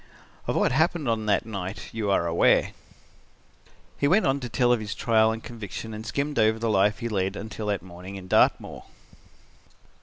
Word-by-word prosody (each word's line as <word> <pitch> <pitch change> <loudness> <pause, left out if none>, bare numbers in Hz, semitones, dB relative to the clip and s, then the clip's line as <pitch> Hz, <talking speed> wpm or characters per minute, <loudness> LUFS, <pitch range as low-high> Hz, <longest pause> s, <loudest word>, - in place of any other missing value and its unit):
"Of - - -1
what - - +2
happened 160 +1 +1
on 110 -2 -1
that 105 - +2
night 100 -3 -6
you 110 -2 -2
are 95 -3 +2
aware." 85 0 +3 1.3
He 140 - +2
went 195 +8 +4
on 135 0 +1
to 125 -3 -6
tell 120 +3 +3
of 120 - +1
his 105 -2 -5
trial 110 -1 +3
and 110 0 -6
conviction 110 -1 -7
and 110 +1 -7
skimmed 140 +4 -2
over 110 0 +3
the 115 0 -1
life 105 +1 +3
he 120 - -4
led 95 -3 -1
until 110 +1 -6
that 100 -4 -1
morning 95 +2 -9
on 95 -1 -10
Dartmoor. - - +2
110 Hz, 185 wpm, -26 LUFS, 100-120 Hz, 1.3 s, went